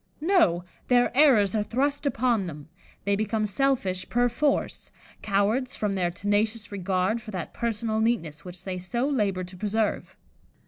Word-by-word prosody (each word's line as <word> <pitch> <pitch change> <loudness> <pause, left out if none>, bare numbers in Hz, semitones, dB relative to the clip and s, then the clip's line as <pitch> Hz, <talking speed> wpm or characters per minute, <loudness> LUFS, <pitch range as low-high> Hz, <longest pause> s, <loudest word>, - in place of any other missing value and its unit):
No! 305 - +3 0.2
their 245 0 +3
errors 250 -10 +5
are 215 - +1
thrust 280 +7 -1
upon 235 -7 +1
them; 150 -2 -9 0.4
they 200 0 +2
become 215 +1 0
selfish 205 -5 0
per 245 +1 +2
force, 280 +4 -1 0.3
cowards 215 +5 +1
from 210 -2 -1
their 180 -2 0
tenacious 210 +4 -1
regard 195 +3 0
for 220 - -11
that 185 -5 -5
personal 225 -1 -1
neatness 170 -10 -1
which 180 0 -9
they 185 -1 -4
so 235 +9 -2
labour 205 -10 0
to 180 +1 -9
preserve. 210 +3 -2
215 Hz, 150 wpm, -26 LUFS, 185-240 Hz, 0.4 s, errors